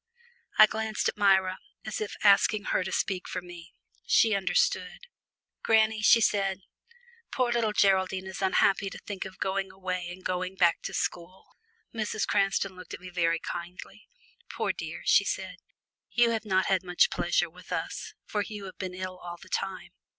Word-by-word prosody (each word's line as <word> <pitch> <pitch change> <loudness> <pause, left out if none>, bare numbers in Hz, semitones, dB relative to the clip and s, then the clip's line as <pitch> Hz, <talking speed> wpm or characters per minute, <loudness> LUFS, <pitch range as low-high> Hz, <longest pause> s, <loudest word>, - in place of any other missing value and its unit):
I - - +10
glanced 220 0 -2
at - - -5
Myra, 190 -3 +3 0.3
as 215 -1 -4
if 210 - -4
asking 205 +1 +5
her 190 - 0
to - - -5
speak 185 -2 -1
for 185 - -3
me. 175 -1 -12 0.3
She 225 -1 +4
understood. 185 -1 0 0.6
"Granny," 220 -1 +3
she 230 +2 +6
said, 195 -3 +1 0.7
"poor 250 -2 +1
little 230 -3 +1
Geraldine 190 -2 +2
is 190 0 -7
unhappy 195 +1 +2
to - - -9
think 200 -2 -6
of 190 -1 -9
going 195 0 -2
away 185 -2 -4
and 180 +1 -10
going 185 +1 -2
back 175 -3 +3
to - - -4
school." 180 +2 -4 0.4
Mrs. 215 -2 -1
Cranston 195 -1 +1
looked 185 -2 -8
at - - -13
me 185 0 -10
very 170 -2 +1
kindly. 175 +2 -8 0.4
"Poor - - -1
dear," - - -7
she - - +5
said, - - -4 0.5
"you 240 -1 +3
have 225 -1 -2
not 190 -2 +2
had 190 -2 +2
much 180 -1 +2
pleasure - - +1
with - - -15
us, - - -4 0.2
as 205 -1 0
you 210 -2 -7
have 190 - -10
been 185 -1 -4
ill 185 0 -6
all 175 -1 -8
the - - -15
time." 195 -1 -3
190 Hz, 175 wpm, -28 LUFS, 185-210 Hz, 0.7 s, I